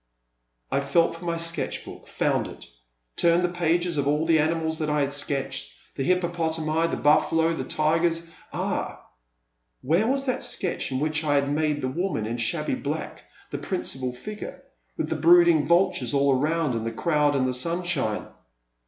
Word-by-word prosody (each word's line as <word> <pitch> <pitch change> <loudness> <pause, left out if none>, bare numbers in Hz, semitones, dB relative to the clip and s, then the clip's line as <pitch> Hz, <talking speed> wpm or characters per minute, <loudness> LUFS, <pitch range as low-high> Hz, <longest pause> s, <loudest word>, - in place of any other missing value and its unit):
I - - +2
felt 140 +5 +2
for 165 +1 -10
my 170 -1 -1
sketch 165 -1 -2
block, - - -11
found - - 0
it; - - -11 0.5
turned 170 +1 +4
the 180 - +2
pages 175 -1 0
of 140 - 0
all 150 +2 +1
the 165 -1 +4
animals 160 +1 0
that 155 -1 -1
I 150 0 +1
had 140 0 -1
sketched, 135 -2 -3 0.2
the - - -5
hippopotami, 165 -2 0
the - - -2
bufficdo, 160 +2 +3
the - - -3
tigers 165 +2 +1
— - - -27
ah! - - -3 0.8
where 170 - +2
was 270 +2 0
that 255 -1 -1
sketch 180 -6 -2
in 130 - -1
whigh 155 +2 0
I 145 -1 +2
had 140 0 +1
made 150 -1 0
the 130 - -1
woman 155 - -2
in 115 +2 -3
shabby 115 - 0
black - - -4 0.3
the. - - -3
principal 130 -1 -2
figure, 210 +13 -8 0.3
with - - -1
the - - -2
brooding 170 -3 +5
vultures 180 -2 +2
all 140 -1 +4
around 155 +1 0
and 115 -1 -2
the 115 - -2
crowd 150 +3 +1
in 130 -2 +2
the 130 - 0
sunshine 155 -5 -1
— - - -27
160 Hz, 180 wpm, -25 LUFS, 140-170 Hz, 0.8 s, brooding